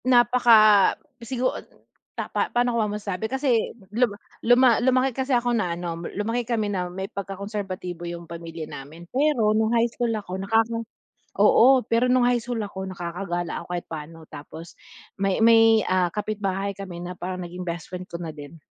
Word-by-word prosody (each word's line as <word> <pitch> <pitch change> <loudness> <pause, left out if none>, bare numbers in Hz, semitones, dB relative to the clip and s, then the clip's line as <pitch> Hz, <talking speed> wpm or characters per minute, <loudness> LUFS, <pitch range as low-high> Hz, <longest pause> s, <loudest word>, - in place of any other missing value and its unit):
Napaka 235 -4 +6 0.3
sigu 245 +2 -3 0.7
ta - - -2
pa - - 0
paano 245 0 +1
ko - - 0
ma 210 - 0
masabi 205 +1 -4
kasi, 265 -4 +1 0.2
lum 230 -3 +1 0.2
luma 245 0 +5
lumaki 255 +1 +2
kasi 265 +2 -3
ako 240 0 0
na 180 -7 -1
ano, 170 -1 -5 0.2
lumaki 225 +4 -1
kami 220 -3 -1
na 180 -2 -2
may 190 +2 -5
pagka-konserbatibo 195 -3 -6
yung 170 0 -7
pamilya 165 -1 -7
namin 155 +5 -10
pero 260 -6 +2
nung 220 0 +2
high 235 0 +3
school 235 0 -2
ako 190 -2 -5
nakaka 225 +3 +1 0.6
oo, 255 +5 +6
pero 245 +2 +2
nung 250 -1 +4
high 245 0 +3
school 240 -2 -3
ako 190 -2 -5
nakaka-gala 175 -1 -4
ako - - -16
kahit 175 -1 -3
paano 160 +1 -8
tapos, 155 +3 -11 0.4
may 195 0 0
may, 225 -1 +6
ah, 180 -2 +1
kapitbahay 200 -2 -2
kami 185 -3 -7
na 175 +1 -6
parang 185 +1 -5
naging 180 +1 -6
best 170 -2 -5
friend 180 0 -6
ko 170 -1 -8
na 160 -3 -6
din. 145 +2 -11
200 Hz, 175 wpm, -24 LUFS, 175-235 Hz, 0.7 s, Napaka